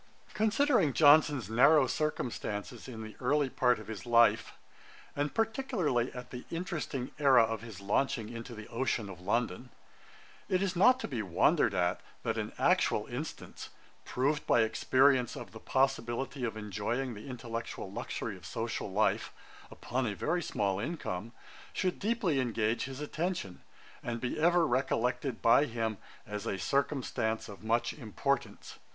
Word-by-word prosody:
] - - -32
Considering 215 - +3
Johnson's 145 - +5
narrow 130 +6 +5
circumstances 120 -6 -3
in 115 -3 -7
the 110 0 -9
early 145 -2 +1
part 125 -1 +3
of - - -10
his 110 -2 -7
life, 115 -2 +4 0.6
and 145 +1 -2
particularly 220 - 0
at 125 0 -8
the 125 -1 -7
interesting 160 -7 -4
aera 135 -5 +6
of 110 -1 -2
his 115 -4 -9
launching 110 +3 0
into 115 +1 -7
the 110 -1 -9
ocean 120 -3 -1
of 90 -2 -11
London, 120 +4 -1 0.8
it 185 +1 +2
is 190 -2 -1
not 250 +8 +5
to - - -4
be 125 -7 -3
wondered 90 -5 +2
at, 90 0 +1 0.2
that - - -1
an - - -3
actual - - +2
instance, - - -7 0.3
proved 145 +4 -1
by 120 - +5
experience 130 +2 +3
of - - -8
the 110 - -10
possibility 135 0 0
of 115 -2 -2
enjoying 110 +5 -2
the 105 +4 -10
intellectual 120 -3 -6
luxury - - -4
of - - -15
social - - -4
life, - - +1 0.4
upon 125 0 -2
a 105 - -2
very 175 - 0
small 100 - -1
income, 115 - -4 0.4
should 185 -1 -1
deeply 205 -9 +1
engage 115 -2 0
his 135 +1 -7
attention, 155 - -3 0.4
and 120 -1 -3
be 125 +5 -3
ever 175 +1 +4
recollected 125 -1 0
by 115 +5 +6
him 115 -5 -3 0.3
as 105 -1 -5
a 95 - -1
circumstance 115 -1 -1
of 100 -1 -11
much 115 +2 +1
importance. 135 +2 -3
125 Hz, 150 wpm, -31 LUFS, 110-145 Hz, 0.8 s, aera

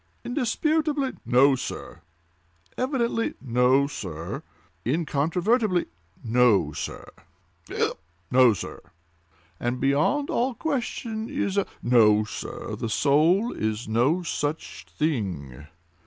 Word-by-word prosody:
"Indisputably—" 290 +2 0 0.2
"No, 135 +3 +5
sir!" 125 - -6 0.7
"Evidently—" 245 -3 -1
"No, 125 +2 +3
sir!" 90 - -6 0.4
"Incontrovertibly—" 175 - +1 0.4
"No, 115 -8 +3
sir!" 75 -1 -5 0.6
"Hiccup!—" - - -1 0.3
"No, 125 -1 +6
sir!" 95 - -7 0.8
"And 120 +1 -2
beyond 150 - +1
all 245 +1 0
question, 235 -6 -3
a—" 200 -9 0 0.2
"No 110 -3 +5
sir, 105 - -6
the 115 - -4
soul 160 - +3
is 110 +2 -2
no 130 +11 +2
such 155 -2 -4
thing!" 90 - -3
145 Hz, 95 wpm, -25 LUFS, -, 0.8 s, No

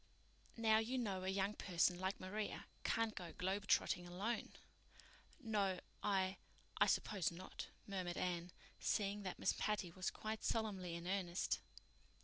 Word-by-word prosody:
Now, 220 -1 +5
you 240 +4 0
know 195 -6 0
a - - -2
young 195 +1 +1
person 180 -2 +2
like 190 +1 -1
Maria 205 +3 -3 0.2
can't 225 -1 +2
go 175 -4 -6
globetrotting 190 -1 +2
alone." 200 +7 -2 0.9
"No—I—I 195 -3 0
suppose 195 -6 +2
not," 180 +2 -6 0.2
murmured 185 -3 -2
Anne, 175 -1 -1 0.3
seeing 205 0 +1
that 185 -3 -3
Miss - - +3
Patty 210 -5 0
was 185 +1 -1
quite 215 0 -4
solemnly 195 -6 0
in 170 0 -5
earnest. 180 -1 +1
190 Hz, 130 wpm, -41 LUFS, 180-210 Hz, 0.9 s, Now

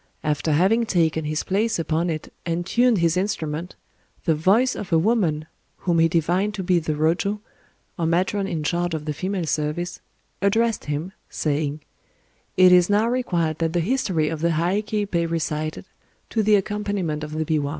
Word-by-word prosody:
After 150 +1 0
having 210 +9 +3
taken 160 -4 +1
his 155 0 -1
place 220 +4 0
upon 165 +1 0
it, 155 -2 -5
and 170 +1 -2
tuned 240 +3 +3
his 170 -1 +2
instrument, 180 -4 -2 0.5
the 165 - +3
voice 200 +12 +3
of 190 - -6
a 165 - +5
woman—whom 170 -3 -1
he 165 - +5
divined 175 +6 0
to 190 - -4
be 180 -1 +3
the 155 -1 -2
Rōjo, 170 +7 +1 0.6
or 165 - +1
matron 190 +4 +1
in 160 -4 -3
charge 175 +2 0
of 150 -1 -5
the 150 - -2
female 185 +2 -2
service—addressed 175 +8 -2
him, 150 +5 -3 0.2
saying,— 150 0 -2 0.8
"It 185 0 +7
is 180 0 +6
now 210 +2 +3
required 175 -11 0
that 165 -1 0
the 175 - +2
history 185 -6 0
of 160 -1 -4
the 170 - +2
Heiké 205 +5 0
be 170 -1 +1
recited, 155 -2 -3 0.5
to 225 - +1
the 210 0 +4
accompaniment 200 -6 -2
of 155 0 -6
the 160 0 -1
biwa." 150 -2 0
170 Hz, 170 wpm, -23 LUFS, 155-200 Hz, 0.8 s, It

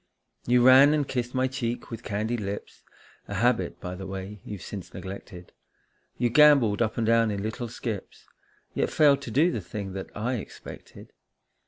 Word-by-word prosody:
You 120 0 +4
ran 135 +3 +8
and 145 -3 0
kissed 125 0 -3
my 130 0 +2
cheek 125 -3 -4
with 115 -1 -6
candied 110 +2 -2
lips, 100 0 -6 0.5
A - - -5
habit, - - +1
by 90 - -6
the 95 +1 -7
way, 95 +1 -7
you've 100 -4 -8
since 100 -4 -8
neglected; 95 -2 -9 0.7
You 120 -1 +1
gambolled 140 -8 +5
up 110 -2 0
and 115 - +1
down 115 0 +3
in 100 -1 -3
little 120 +3 -4
skips, 110 -3 -6 0.5
Yet - - 0
failed 145 -3 +4
to - - -7
do 150 +10 +3
the 110 - -3
thing 95 +2 -6
that 95 0 -6
I 120 +4 -1
expected. 105 - -11
115 Hz, 175 wpm, -26 LUFS, 100-125 Hz, 0.7 s, ran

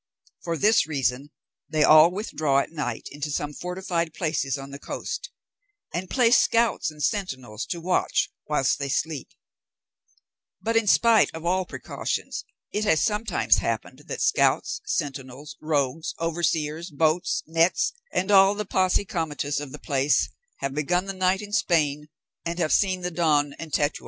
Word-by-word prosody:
For 170 -1 -2
this 215 0 +4
reason, 135 -2 -1 0.4
they 155 -1 +2
all 155 +2 +8
withdraw 155 -8 -1
at 140 - 0
night 150 -3 -4
into 145 +1 -5
some 145 +1 -2
fortified 175 -2 -3
places 150 -5 -1
on 135 0 -9
the 140 - -8
coast, 485 - -5 0.6
and 180 +2 -3
place 245 -2 +5
scouts 230 -5 +2
and 150 -1 -8
sentinels 130 - -2
to 175 - -3
watch 180 +2 0 0.2
whilst 150 -3 +1
they 140 -1 -3
sleep; 150 0 -2 1.3
but 225 +5 -2
in 225 -2 +3
spite 230 +2 +5
of 160 +1 -7
all 185 +1 +1
precautions, - - -4 0.3
it 210 - -1
has 160 -7 +3
sometimes 215 0 +2
happened - - -3
that - - -4
scouts, 450 +2 +2
sentinels, 140 - -4
rogues, 155 +1 -1
overseers, 165 0 -1
boats, 155 +3 +1
nets, 165 - +2 0.2
and 190 +3 0
all 195 0 +6
the 210 0 -3
posse 185 +1 +1
comitatus 150 -5 -2
of 145 -2 -7
the - - -7
place 140 0 +1 0.3
have 135 0 -2
begun 175 +6 0
the 195 - -4
night 185 +1 +1
in 205 0 -9
Spain 150 -7 +1 0.3
and 170 0 -3
have 160 -3 +1
seen 185 -2 +2
the 180 0 -3
dawn 150 -4 +2
in 165 - -7
Tetuan. 145 0 0
165 Hz, 155 wpm, -25 LUFS, 145-185 Hz, 1.3 s, all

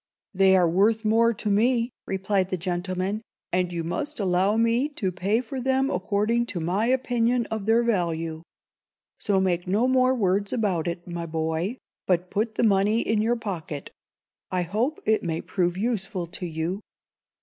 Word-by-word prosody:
"They 190 0 +5
are 180 -2 +4
worth 215 +6 +2
more 230 +2 +4
to 215 -1 -3
me," 235 +3 +2 0.2
replied 190 0 0
the 185 - -1
gentleman, 185 +3 -2 0.3
"and 180 0 +1
you 170 -1 -3
must 290 - -3
allow 190 +2 +2
me 230 +5 +2
to 190 -4 -1
pay 195 +6 0
for 255 +2 -6
them 265 +1 +1
according 210 +6 0
to 185 - -3
my 185 +7 0
opinion 245 -2 +1
of 220 -2 -3
their 230 +2 +4
value. 165 -7 -1 0.8
So 200 -2 +1
make 180 -2 0
no 210 +7 +2
more 255 0 +3
words 200 -2 +1
about 190 -8 0
it, 170 +1 -4
my 170 -1 -4
boy, 160 +7 -2 0.3
but 180 -1 +1
put 220 +2 -1
the - - +1
money 210 +1 +3
in 215 -1 +1
your 230 +2 +2
pocket. 175 -10 -5 0.6
I 180 -1 0
hope 225 - -1
it 220 0 +3
may 165 -2 -2
prove 175 -2 -1
useful 195 -4 -2
to 180 +2 -5
you." 165 +5 -3
200 Hz, 170 wpm, -25 LUFS, 180-230 Hz, 0.8 s, They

